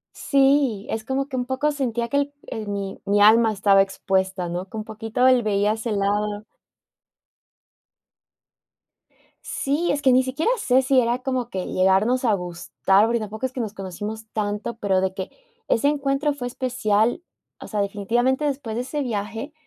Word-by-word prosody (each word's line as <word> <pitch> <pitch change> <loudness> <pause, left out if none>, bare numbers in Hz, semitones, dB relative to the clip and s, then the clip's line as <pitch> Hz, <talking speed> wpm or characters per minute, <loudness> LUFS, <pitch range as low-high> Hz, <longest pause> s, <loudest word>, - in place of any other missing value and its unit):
Sí, 270 -6 +2
es 220 0 -3
como 270 +2 -1
que 270 - -6
un 250 - -1
poco 265 +4 0
sentía 240 -5 -2
que 280 - +1
el 285 0 0
el 215 -2 -5
mi 200 -1 -4
mi 205 +1 +2
alma 225 +2 +6
estaba 195 -1 +4
expuesta, 190 -1 -1
¿no?, 175 +2 -3
que 220 - -9
un 215 - -3
poquito 225 +3 0
él 255 -2 +4
veía 205 0 +1
ese 220 +1 -4
lado. 205 +1 -1 3.0
Sí, 295 +6 -1
es 285 - -1
que 265 - +4
ni 255 +1 +5
siquiera 275 - 0
sé 260 - +3
si 265 0 +3
era 240 0 +1
como 255 -2 -2
que 185 -4 -4
llegarnos 195 +8 +2
a 220 - +4
gustar, 180 +2 +1
porque 235 +1 0
tampoco 215 +3 -5
es 260 - -4
que 260 - -3
nos 215 -3 -4
conocimos 205 +3 -6
tanto, 210 +2 -3
pero 195 -4 +1
de 190 0 -1
que 190 -1 -5 0.4
ese 230 - +2
encuentro 285 0 0
fue 255 -3 -5
especial 240 - 0 0.4
o - - -8
sea, 210 -2 -1
definitivamente, 240 +8 0
después 270 -6 -3
de 245 - -1
ese 295 +3 -3
viaje 225 +2 -4
225 Hz, 175 wpm, -23 LUFS, 205-260 Hz, 3.0 s, alma